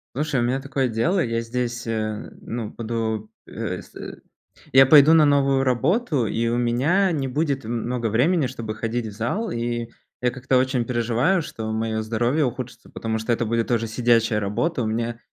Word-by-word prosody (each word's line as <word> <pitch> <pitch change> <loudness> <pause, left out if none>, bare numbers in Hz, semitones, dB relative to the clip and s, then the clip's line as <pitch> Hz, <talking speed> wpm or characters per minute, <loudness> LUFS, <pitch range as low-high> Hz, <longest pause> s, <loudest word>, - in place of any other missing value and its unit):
Слушай, 150 -1 0
у 120 - +1
меня 125 +3 0
такое 135 -1 -1
дело, 125 - +1
я 115 -1 -1
здесь, 120 0 -3
э, 110 -2 -3
ну, 115 -2 -5
буду, 110 -2 -3 0.2
э, - - -4
се - - -10 0.5
я 135 0 +8
пойду 145 +3 +7
на 160 -2 +6
новую 140 -2 +3
работу, 140 - +1
и 115 +2 -1
у 120 +1 0
меня 140 +12 +2
не 140 -4 -1
будет 140 0 -1
м 115 +1 -3
много 120 -1 -1
времени, 140 - +2
чтобы 115 -4 -5
ходить 115 +1 -3
в 110 - -7
зал. 120 - -2
И 120 0 -2 0.3
я 125 - +1
как-то 130 +1 +1
очень 130 -1 +1
переживаю, 120 +9 +1
что 110 -8 -5
мое 110 0 -1
здоровье 120 +7 +1
ухудшится, 125 -1 -5
потому 110 0 -3
что 110 +2 -1
это 120 0 0
будет 115 +1 0
тоже 115 -2 +1
сидячая 115 -1 +2
работа, 120 +9 -1
у - - -1
меня 115 +1 -2
120 Hz, 185 wpm, -23 LUFS, 115-135 Hz, 0.5 s, я